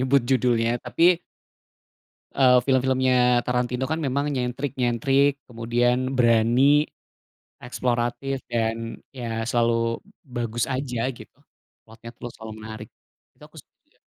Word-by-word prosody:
nyebut 130 +1 +3
judulnya. 120 -2 +2
Tapi, 170 +8 +3 1.2
eee, 125 -2 +6
film-filmnya 130 -2 +3
Tarantino 125 +1 -1
kan 160 - 0
memang 140 0 -1
nyentrik-nyentrik, 130 +1 +1 0.2
kemudian 120 +1 0 0.2
berani, 125 +5 +4 0.7
eksploratif 125 +2 -2
dan 115 0 -3
ya 115 -4 -4
selalu 115 -1 +1 0.2
bagus 120 -4 -3
aja 130 -3 -3
gitu. 115 0 -14 0.5
Plotnya 115 +1 -12
terus 120 -1 -8
selalu 110 -1 -8
menarik. 110 0 -8 0.5
Itu - - -19
aku - - -19 0.3
iya. - - -35
125 Hz, 105 wpm, -24 LUFS, 115-130 Hz, 1.2 s, eee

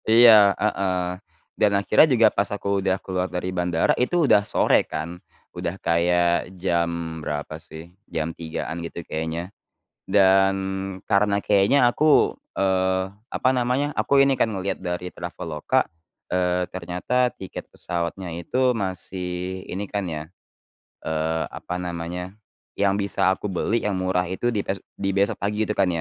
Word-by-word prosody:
Iya, 110 -3 +7
heeh, 90 -3 -1 0.4
dan 105 - +5
akhirnya 100 +10 +5
juga 115 -4 +5
pas 100 - 0
aku 100 -1 -1
udah 95 0 +1
keluar 95 -1 -1
dari 90 +1 -3
bandara 90 -2 +1
itu 170 +6 +2
udah 105 - +5
sore 105 - +3
kan. 85 +3 -5 0.3
Udah 85 +3 -4
kayak 85 0 +2
jam 85 -2 -1
berapa 75 +1 -4
sih, 80 +3 -11 0.2
jam 80 +1 -2
3.00-an 80 0 -5
gitu 85 0 -6
kayaknya 80 +4 -4 0.5
dan 95 0 +4 0.6
karena 100 0 +3
kayaknya 105 +6 +4
aku, 150 +4 +3 0.2
eee, 95 -1 +1 0.3
apa 130 - +2
namanya, 130 +3 +1
aku 140 -1 +4
ini 140 0 +3
kan - - +4
ngelihat 95 0 -2
dari 90 0 -4
Traveloka, 85 -3 -2 0.4
eee, 90 0 +1
ternyata 95 +8 -1
tiket 95 - -8
pesawatnya 85 +1 -4
itu 125 +9 0
masih 95 -1 -3
ini 100 +2 -5
kan 100 -1 -2
ya, 75 -1 -4 0.8
eee, 80 +1 -1
apa 90 - -5
namanya, 90 +1 -5 0.4
yang 100 -1 +3
bisa 100 -2 +2
aku 105 - -6
beli 105 +5 0
yang 105 - 0
murah 95 0 0
itu 120 +6 0
di 105 - 0
bes 95 - -2 0.2
di 100 0 -1
besok 100 +1 +1
pagi 105 +2 -1
itu 105 - 0
kan. 100 - +2
95 Hz, 145 wpm, -24 LUFS, 85-100 Hz, 0.8 s, Iya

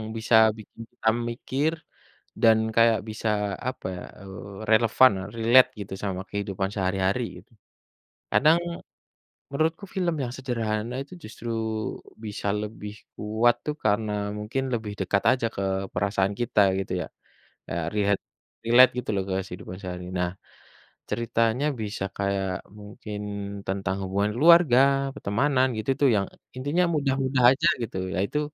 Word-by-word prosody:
bisa 115 +1 +2 0.2
bikin 110 +1 -12
kita 120 -2 -6 0.2
mikir 135 +6 -1 0.7
dan 110 -1 +6 0.2
kayak 115 -1 +5
bisa 110 +1 -2 0.4
apa 130 - -9
ya, 90 - -7 0.2
eee, 100 0 -10
relevan, 110 +2 +5 0.3
relate 125 +3 +6
gitu 100 -1 -6
sama 95 -2 -2
kehidupan 100 -1 -2
sehari-hari 95 +4 0 0.2
gitu. 95 - -22 0.8
Kadang, 160 +3 +5 0.9
menurutku 160 +6 0
film 175 -3 0
yang 120 - -4
sederhana 115 -3 -2
itu 145 - -15
justru 115 +2 -8 0.8
bisa 105 -1 -4
lebih 105 -1 -6 0.2
kuat 110 +3 +2
tuh 150 - -2
karena 105 0 +2 0.3
mungkin 110 +6 -2
lebih 110 -3 -3
dekat 100 +1 +1
aja 125 -2 0
ke 100 - -3 0.3
perasaan 100 +1 0
kita 115 -3 +2 0.2
gitu 95 - -5
ya. - - -12 0.6
Ya - - -3 0.2
riet 100 -1 +2 0.5
relate 120 +3 +7
gitu - - -4
loh 95 - 0
kehidupan 95 -1 -4
sehari. 90 -1 -6
Nah, 90 -1 0 0.8
ceritanya 115 +3 0 0.2
bisa 105 -2 -4
kayak 95 -2 -1 0.2
mungkin 105 0 -8 0.5
tentang 95 -1 -1
hubungan 100 +2 0
keluarga, 140 -3 +5
pertemanan 130 +2 +1
gitu 110 +4 -4
tuh 140 - +5
yang 100 -1 +1 0.3
intinya 145 +7 +1
mudah-mudah 135 -2 +1
aja 145 +5 +2 0.2
gitu, 105 - -5 0.2
ya - - -1
itu 150 +9 -1
110 Hz, 130 wpm, -26 LUFS, 100-130 Hz, 0.9 s, relate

